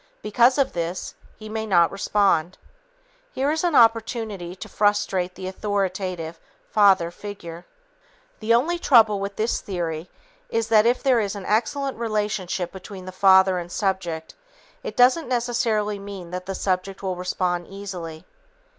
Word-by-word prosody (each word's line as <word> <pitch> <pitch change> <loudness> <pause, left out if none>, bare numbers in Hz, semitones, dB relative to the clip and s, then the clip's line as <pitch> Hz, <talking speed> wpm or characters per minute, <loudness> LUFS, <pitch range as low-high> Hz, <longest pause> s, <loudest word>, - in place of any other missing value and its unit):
Because 240 +5 +4
of 275 -1 +1
this, 170 +1 -4 0.2
he 215 - -10
may 220 0 -4
not 175 -4 +4
respond. 195 -4 +1 0.8
Here 275 +3 0
is 315 +2 -1
an 345 -4 +1
opportunity 225 -5 +2
to 185 - -9
frustrate 205 -3 0
the 185 - -6
authoritative 185 -4 -3 0.3
(father) 195 -5 +4
figure. 175 -4 -9 0.7
The 220 +1 -1
only 305 +10 +3
trouble 225 -9 +5
with 200 0 -4
this 220 +2 -1
theory 170 -3 -4 0.4
is 230 0 -1
that 220 0 +5
if 245 +1 +1
there 260 -4 +4
is 205 -2 -2
an 200 -2 -7
excellent 265 +5 -1
relationship 210 -5 -2
between 190 -1 -10
the 185 - -7
father 190 0 +5
and 175 0 -8
subject, 180 -6 -2 0.5
it - - -7
doesn't 255 +6 +4
necessarily 230 -4 0
mean 195 -3 -8
that 180 0 -6
the 195 - -3
subject 190 +1 -2
will 190 -1 -2
respond 180 -1 -2
easily. 180 -5 -7
200 Hz, 145 wpm, -23 LUFS, 180-225 Hz, 0.8 s, trouble